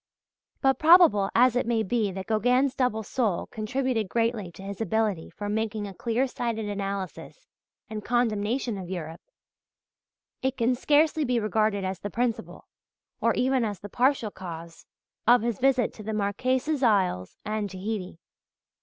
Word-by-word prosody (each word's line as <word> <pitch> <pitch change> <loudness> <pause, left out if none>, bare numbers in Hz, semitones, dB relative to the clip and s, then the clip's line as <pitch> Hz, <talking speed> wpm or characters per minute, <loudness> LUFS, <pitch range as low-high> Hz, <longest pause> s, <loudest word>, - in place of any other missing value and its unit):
But, 270 -1 +3
probable 310 - +6
as 250 +1 +5
it 245 - 0
may 230 -2 +1
be 215 -1 0
that 190 0 -6
Gauguin's 250 +4 +2
double 250 -5 0
soul 215 -5 -1
contributed 230 -1 -2
greatly 225 -5 -1
to 190 - -11
his 200 +2 -6
ability 215 -4 0
for 205 - -6
making 215 0 -2
a 200 - -7
clear 235 +6 0
sighted 235 -4 -3
analysis 200 - -5 0.4
and 215 -1 -6
condemnation 230 -1 0
of 180 -2 -7
Europe, 165 -3 -6 1.2
it 265 0 -1
can 240 +1 +2
scarcely 300 +4 +3
be 250 -3 +1
regarded 215 -2 +1
as 185 -1 -3
the 205 - -5
principal, 235 +3 -3 0.5
or - - +2
even 260 -1 +2
as 205 -4 -3
the 205 - -9
partial 250 -2 +1
cause 170 -3 -9 0.4
of 240 -1 +6
his 235 -3 -1
visit 255 -3 +2
to - - -11
the 220 +1 -4
Marquesas 255 +8 0
Isles 190 - +1
and 215 -1 -2
Tahiti. 190 -1 -5
220 Hz, 155 wpm, -27 LUFS, 200-250 Hz, 1.2 s, probable